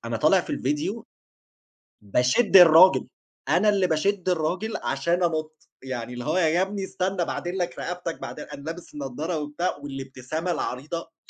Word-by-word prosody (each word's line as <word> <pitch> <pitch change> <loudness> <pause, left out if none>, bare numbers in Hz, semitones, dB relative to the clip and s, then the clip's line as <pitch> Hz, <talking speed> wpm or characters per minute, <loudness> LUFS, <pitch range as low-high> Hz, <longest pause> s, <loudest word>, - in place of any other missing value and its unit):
أنا 115 -1 -2
طالع 155 +9 +4
في - - -9
الفيديو، 150 - -2 1.0
باشد 130 - +3
الراجل، 180 +1 +7 0.4
أنا 210 - +4
اللي 195 -3 +2
باشد 185 +4 0
الراجل، 180 +6 -1
عشان 170 +6 0
أنُطّ، 155 -2 -3
يعني 125 -2 -5
اللي 120 0 -6
هو 185 - 0
يا 170 0 +3
ابني 195 0 -2
استنى 185 -1 -2
باعدل 175 +3 -4
لك 175 -1 -3
رقبتك، 175 -2 -5
بعد - - -7
أنا 140 - -9
لابس 165 +3 -8
النَّضَّارة 150 +4 -4
وبتاع، 150 +5 -2
والإبتسامة 140 +4 -5
العريضة 165 +5 -4
165 Hz, 150 wpm, -25 LUFS, 145-185 Hz, 1.0 s, الراجل